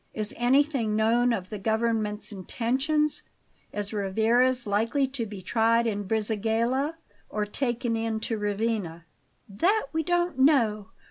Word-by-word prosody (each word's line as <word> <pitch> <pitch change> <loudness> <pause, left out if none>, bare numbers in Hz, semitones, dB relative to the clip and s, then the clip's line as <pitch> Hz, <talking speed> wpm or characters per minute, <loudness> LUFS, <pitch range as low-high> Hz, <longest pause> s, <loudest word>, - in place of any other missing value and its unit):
Is 215 -1 0
anything 255 -2 +2
known 235 +3 +3
of 190 -5 -3
the 210 - -4
government's 220 0 -1
intentions? 265 - 0 0.5
Is 205 0 -4
Rivarez 230 +5 +2
likely 225 +7 +1
to 255 -4 -4
be 200 -2 -9
tried 230 +3 +2
in 205 -3 -2
Brisighella 225 - 0 0.3
or 210 -1 -2
taken 240 +1 -2
in 225 -1 -1
to 225 -1 -2
Ravenna?" 205 -5 -2 0.4
"That 340 - +1
we 320 - +1
don't 350 -1 0
know. 230 -8 +3
225 Hz, 130 wpm, -27 LUFS, 210-255 Hz, 0.5 s, known